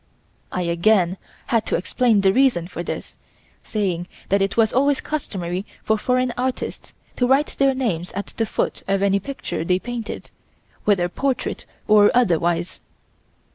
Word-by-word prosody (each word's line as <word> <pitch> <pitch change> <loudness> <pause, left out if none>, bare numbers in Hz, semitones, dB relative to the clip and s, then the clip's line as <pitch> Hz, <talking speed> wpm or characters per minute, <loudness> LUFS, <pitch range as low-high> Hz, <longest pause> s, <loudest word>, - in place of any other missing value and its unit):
I 180 - -1
again 175 +2 +2 0.3
had 230 -2 0
to - - +1
explain 220 +3 +2
the 190 -1 +4
reason 250 -10 +3
for 175 - -6
this, - - -6 0.4
saying 185 -5 -2 0.2
that 200 +1 +3
it 195 +2 0
was 220 -2 +4
always 280 +2 +3
customary 190 - -3 0.2
for 220 - +2
foreign 250 +3 +1
artists 255 +1 -3 0.2
to 250 - +2
write 275 +3 +2
their 275 -1 +4
names 185 -10 -2
at 200 +1 -5
the 225 - 0
foot - - -2
of 195 0 +1
any 200 0 +3
picture 195 - -4
they 180 +2 +2
painted, 235 +2 -6 0.5
whether 190 -4 +3
portrait 265 +8 -2 0.2
or 210 -1 +7
otherwise. 175 -6 +1
205 Hz, 150 wpm, -22 LUFS, 180-250 Hz, 0.5 s, or